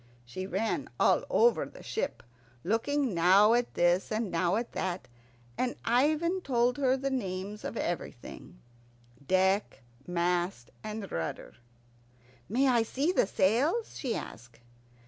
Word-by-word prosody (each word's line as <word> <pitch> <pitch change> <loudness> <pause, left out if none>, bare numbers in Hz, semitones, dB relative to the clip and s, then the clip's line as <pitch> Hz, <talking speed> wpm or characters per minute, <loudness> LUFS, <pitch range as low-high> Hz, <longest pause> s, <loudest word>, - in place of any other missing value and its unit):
She 185 +11 -6
ran 205 +4 -2
all - - +4
over 475 +1 +4
the - - -11
ship, 450 - -3 0.4
looking 250 +5 0
now 190 +6 +5
at 240 0 0
this 175 +4 +2
and 215 -2 -1
now 170 +2 +1
at 235 +2 -2
that, 185 -1 -3 0.5
and 250 -1 0
Ivan 310 +9 +2
told 245 -2 +1
her 265 -1 +3
the 275 +1 -2
names 200 -4 -4
of 230 - -5
everything 145 - -5 0.7
deck, 190 -3 +1 0.2
mast, 175 -5 -1
and 215 -2 -6
rudder. 80 -1 -4 1.0
"May 260 +5 +2
I 245 -3 +4
see 275 +8 0
the 365 - +2
sails?" 265 - +1
she 250 -5 -2
asked. 120 +1 -9
215 Hz, 130 wpm, -30 LUFS, 180-260 Hz, 1.0 s, now